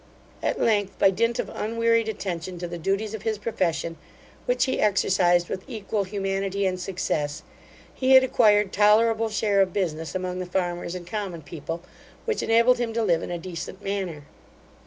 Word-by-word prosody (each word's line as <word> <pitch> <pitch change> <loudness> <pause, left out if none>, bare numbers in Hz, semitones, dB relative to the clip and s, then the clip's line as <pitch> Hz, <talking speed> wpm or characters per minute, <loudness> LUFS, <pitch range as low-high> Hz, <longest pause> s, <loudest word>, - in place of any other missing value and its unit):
At - - -1
length, 205 -3 +1
by 195 - +5
dint 230 +4 +1
of - - -2
unwearied 230 0 +1
attention 185 -4 -4
to 175 0 -4
the 175 0 -6
duties 195 +5 -1
of 220 - -5
his 220 -1 -1
profession, 180 -6 -2 0.5
which - - +2
he 260 - -1
exercised 185 -4 +3
with 190 - -5
equal 210 -2 -2
humanity 195 0 -2
and 185 -1 0
success, 160 -5 -2 0.5
he 265 0 +2
had 260 0 +9
acquired 210 -6 +3
tolerable 220 +2 +4
share 210 -2 +2
of 185 -2 +1
business 165 -4 -2
among 185 0 -3
the 180 - -4
farmers 175 -1 -2
and 180 -1 -7
common 185 -4 -5
people, 165 +3 -6 0.4
which 450 -2 -1
enabled 235 +2 +4
him 235 -2 -1
to 230 0 0
live 170 -5 +2
in - - -5
a 175 - -2
decent 185 +3 -7
manner. 190 -7 -3
195 Hz, 175 wpm, -25 LUFS, 175-220 Hz, 0.5 s, had